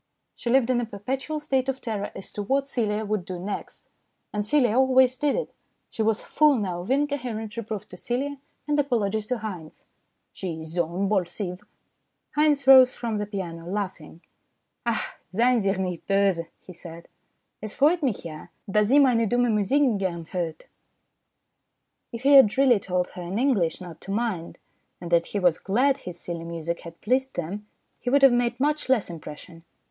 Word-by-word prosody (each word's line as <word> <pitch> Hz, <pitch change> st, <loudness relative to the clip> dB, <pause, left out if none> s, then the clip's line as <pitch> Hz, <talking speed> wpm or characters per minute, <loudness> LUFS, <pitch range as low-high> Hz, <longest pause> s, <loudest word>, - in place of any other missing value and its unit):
She 235 Hz, -, -5 dB
lived 255 Hz, 0 st, +4 dB
in 240 Hz, -1 st, +2 dB
a -, -, -2 dB
perpetual 260 Hz, +8 st, -4 dB
state 270 Hz, -3 st, 0 dB
of 265 Hz, 0 st, -2 dB
terror 215 Hz, -5 st, -3 dB
as 195 Hz, -, -7 dB
to 205 Hz, -, -4 dB
what 270 Hz, +6 st, 0 dB
Celia 220 Hz, -5 st, -1 dB
would 210 Hz, -2 st, -1 dB
do 185 Hz, 0 st, -6 dB
next, 195 Hz, +3 st, -6 dB, 0.5 s
and 210 Hz, 0 st, -1 dB
Celia 245 Hz, -1 st, +2 dB
always 260 Hz, 0 st, +4 dB
did 285 Hz, +2 st, +1 dB
it. -, -, -3 dB, 0.4 s
She -, -, -4 dB
was 220 Hz, 0 st, 0 dB
full 300 Hz, -1 st, +4 dB
now 185 Hz, -6 st, -2 dB
of 180 Hz, -, -9 dB
incoherent 255 Hz, -6 st, -1 dB
reproof 215 Hz, -3 st, -5 dB
to 180 Hz, -, -11 dB
Celia 275 Hz, +7 st, -3 dB, 0.3 s
and 295 Hz, 0 st, +1 dB
apologies 220 Hz, -6 st, 0 dB
to 250 Hz, -, -1 dB
Haynes. 185 Hz, -8 st, -8 dB, 0.2 s
" -, -, -50 dB
She 165 Hz, -4 st, -5 dB
is 160 Hz, -, -9 dB
zo 170 Hz, 0 st, 0 dB
imbolsive." 185 Hz, 0 st, -2 dB, 0.7 s
Haynes 295 Hz, -2 st, +3 dB
rose 260 Hz, -1 st, +8 dB
from 230 Hz, -3 st, -3 dB
the 210 Hz, 0 st, -3 dB
piano 170 Hz, -5 st, -6 dB
laughing. 185 Hz, -5 st, -5 dB, 0.3 s
" -, -, -51 dB
Ach, 235 Hz, -, -2 dB
seien 235 Hz, +4 st, +3 dB
Sie 195 Hz, -, +1 dB
ihr 195 Hz, -, 0 dB
nicht 180 Hz, -3 st, -4 dB
bose" 195 Hz, -4 st, +2 dB, 0.2 s
he 185 Hz, -, -12 dB
said. 170 Hz, -1 st, -11 dB, 0.3 s
" -, -, -51 dB
Es 215 Hz, 0 st, -6 dB
freut 320 Hz, +5 st, +3 dB
mich 250 Hz, -, -1 dB
ja 155 Hz, -2 st, -8 dB
y -, -, -35 dB, 0.2 s
dass 210 Hz, +1 st, +3 dB
sie 270 Hz, +6 st, +4 dB
meine 245 Hz, -5 st, +4 dB
dumme 245 Hz, -1 st, +2 dB
Musik 220 Hz, +8 st, +2 dB, 0.2 s
gerne 170 Hz, -4 st, -3 dB
hort? 165 Hz, -3 st, -3 dB, 1.5 s
If 230 Hz, +1 st, -7 dB
he 280 Hz, +1 st, +5 dB
had 265 Hz, -6 st, +7 dB
really 260 Hz, -5 st, +5 dB
told 180 Hz, -1 st, -1 dB
her 180 Hz, -, -9 dB
in 175 Hz, +3 st, -4 dB
English 220 Hz, -, +1 dB
not 175 Hz, -3 st, -10 dB
to 195 Hz, -, -7 dB
mind, 200 Hz, -6 st, -2 dB, 0.4 s
and 175 Hz, -1 st, -8 dB
that 170 Hz, -1 st, +3 dB
he -, -, -4 dB
was 175 Hz, -4 st, +3 dB
glad 260 Hz, +8 st, +2 dB
his 180 Hz, -7 st, -9 dB
silly 170 Hz, -1 st, -5 dB
music 170 Hz, 0 st, -4 dB
had 170 Hz, 0 st, -12 dB
pleased 260 Hz, +4 st, 0 dB
them, 195 Hz, +5 st, -5 dB, 0.3 s
he 245 Hz, -, -3 dB
would 275 Hz, +2 st, +3 dB
have 270 Hz, -2 st, +8 dB
made 240 Hz, 0 st, 0 dB
much 295 Hz, 0 st, 0 dB
less 250 Hz, -6 st, +3 dB
impression. 165 Hz, 0 st, -10 dB
210 Hz, 190 wpm, -25 LUFS, 180-260 Hz, 1.5 s, rose